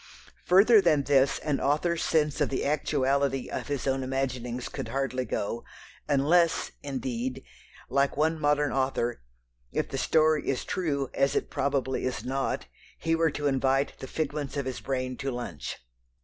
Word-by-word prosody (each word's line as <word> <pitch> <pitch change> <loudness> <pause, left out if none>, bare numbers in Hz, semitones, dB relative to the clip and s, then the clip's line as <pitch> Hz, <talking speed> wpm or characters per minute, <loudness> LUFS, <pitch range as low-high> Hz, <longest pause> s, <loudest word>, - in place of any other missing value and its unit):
Further 205 +4 +7
than 155 -6 +3
this 135 -1 +3
an 150 -3 -1
author's 165 +4 +1
sense 150 -2 +1
of 145 - +2
the 135 - -2
actuality 140 -2 +1
of - - -4
his 145 -3 -2
own 135 -1 +1
imaginings 130 -2 -2
could - - -5
hardly 135 -2 -1
go, 115 +2 -3 0.4
unless, 155 +4 +3
indeed, 130 -2 -3 0.4
like 140 0 +1
one 160 +2 +2
modern 145 0 +2
author 130 - 0 0.5
if - - -1
the - - -3
story 155 -1 +3
is 135 - -1
true, 145 -7 -1
as 135 0 +2
it - - -1
probably 135 -2 0
is 130 - -2
not 135 +1 -1 0.3
he 165 0 0
were 165 0 +3
to 145 0 -4
invite 135 0 +2
the 130 - -6
figments 145 -1 -3
of 140 - -1
his 130 -1 -4
brain 130 -2 -2
to 135 -1 -3
lunch! 120 -2 -5
140 Hz, 160 wpm, -28 LUFS, 130-150 Hz, 0.5 s, Further